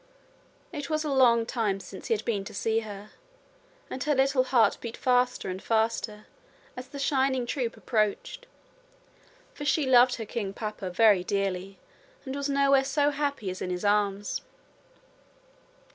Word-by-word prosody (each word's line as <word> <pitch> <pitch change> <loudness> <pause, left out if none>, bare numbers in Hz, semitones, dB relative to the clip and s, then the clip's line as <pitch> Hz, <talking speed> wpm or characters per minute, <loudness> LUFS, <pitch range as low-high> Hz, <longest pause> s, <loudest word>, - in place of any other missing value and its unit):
It 290 -3 -5
was 310 0 0
a 300 - -2
long 240 -4 +4
time 215 -5 -1
since - - -10
he 455 - +2
had - - -6
been 205 -4 -1
to 210 - -9
see 225 +2 +1
her, 210 -1 -9 0.8
and 255 - -5
her 300 -1 +2
little 265 -1 +3
heart 235 -5 +3
beat 235 -1 -6
faster 250 -2 +1
and 185 0 -4
faster 220 -1 -1 0.5
as 250 0 -8
the 285 - -9
shining 265 -2 +1
troop 240 -1 -3
approached, 225 - -1 1.1
for 290 - -8
she 290 0 +2
loved 250 -1 +5
her 225 - -6
king 205 -3 -4
papa 210 -3 -5
very 195 0 +4
dearly 195 0 -2 0.5
and 265 0 -5
was 280 0 -2
nowhere 275 -1 +4
so 285 +2 +1
happy 280 -8 -2
as 185 - -8
in - - -3
his 180 +2 -3
arms. 205 -1 +1
235 Hz, 160 wpm, -27 LUFS, 205-275 Hz, 1.1 s, loved